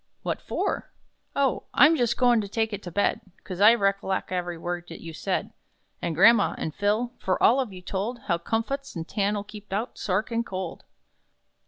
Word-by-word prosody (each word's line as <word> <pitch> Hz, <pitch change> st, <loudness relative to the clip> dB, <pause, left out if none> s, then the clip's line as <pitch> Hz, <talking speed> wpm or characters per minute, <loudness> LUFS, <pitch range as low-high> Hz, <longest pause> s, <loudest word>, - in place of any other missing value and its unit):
"What -, -, -2 dB
for?" -, -, -2 dB, 0.5 s
"Oh, 275 Hz, -2 st, +1 dB
I'm 300 Hz, +5 st, +7 dB
jus' 240 Hz, -5 st, +1 dB
goin' 245 Hz, -3 st, +4 dB
to 205 Hz, -, -5 dB
take 220 Hz, +1 st, -1 dB
it 205 Hz, -, -4 dB
to 175 Hz, -, -8 dB
bed, 205 Hz, +4 st, +1 dB, 0.2 s
'Cos, 185 Hz, -2 st, -7 dB
I 220 Hz, +3 st, +8 dB
recollec' 195 Hz, -3 st, 0 dB
every 175 Hz, -2 st, -2 dB
word 175 Hz, +1 st, -4 dB
that -, -, -8 dB
you 165 Hz, -1 st, -8 dB
said, -, -, -2 dB, 0.5 s
And 170 Hz, -2 st, -2 dB
gramma, 210 Hz, +5 st, +6 dB
and 155 Hz, -, -3 dB
Phil; 215 Hz, +6 st, 0 dB
for 185 Hz, -, 0 dB
all 255 Hz, -, +6 dB
of 255 Hz, -6 st, -1 dB
you 180 Hz, -1 st, -10 dB
told 210 Hz, +7 st, -3 dB
How 170 Hz, -3 st, +1 dB
'comfuts,' 230 Hz, +9 st, -2 dB
and 165 Hz, -1 st, -5 dB
'tan'll' 205 Hz, 0 st, 0 dB
keep 205 Hz, 0 st, -12 dB
out 210 Hz, +5 st, -3 dB
SA 190 Hz, -, -2 dB
ARCHINKOLD!" 205 Hz, -3 st, -2 dB
205 Hz, 185 wpm, -26 LUFS, 185-230 Hz, 0.5 s, I